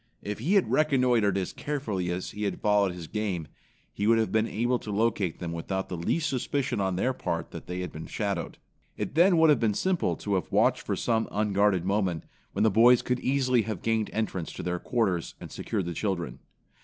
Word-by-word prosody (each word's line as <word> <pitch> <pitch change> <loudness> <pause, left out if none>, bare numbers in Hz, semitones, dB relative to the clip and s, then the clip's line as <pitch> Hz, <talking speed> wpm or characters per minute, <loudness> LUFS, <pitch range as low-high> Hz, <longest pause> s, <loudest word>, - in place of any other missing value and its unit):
If 105 0 -4
he 165 - +1
had 195 - +3
reconnoitered 125 -9 +3
as 95 -2 -2
carefully 110 -12 -3
as 90 +1 -3
he 105 0 -4
had 100 - -2
followed 105 -2 +3
his 90 -2 -7
game, 95 -4 -3 0.5
he 105 - -1
would 115 0 +5
have 110 -1 +1
been 110 +1 +2
able 120 +3 0
to - - -9
locate 105 -4 0
them 85 -2 -5
without 95 +3 -3
the 90 - -3
least 145 - 0
suspicion 135 -4 -1
on 95 -1 0
their 125 +8 +1
part - - -3
that - - -9
they 90 +1 -4
had 90 - -5
been 80 - -8
shadowed. 100 -6 -3 0.4
It - - -3
then 175 +3 +5
would 160 -1 +6
have 140 - +3
been 110 -3 +1
simple 185 - +1
to 100 - -3
have 95 - -1
watched - - +3
for - - -2
some 115 -1 0
unguarded 100 -3 +2
moment, 95 -4 0 0.3
when - - +1
the 110 - +4
boys 120 +4 +6
could 125 0 0
easily 130 -2 +2
have 110 -4 -5
gained 110 -1 +1
entrance 95 -6 -2
to - - -6
their 90 0 -2
quarters 95 -9 -1
and - - -9
secured 100 -5 -3
the 85 - -3
children. 85 - -3
105 Hz, 215 wpm, -28 LUFS, 95-120 Hz, 0.5 s, would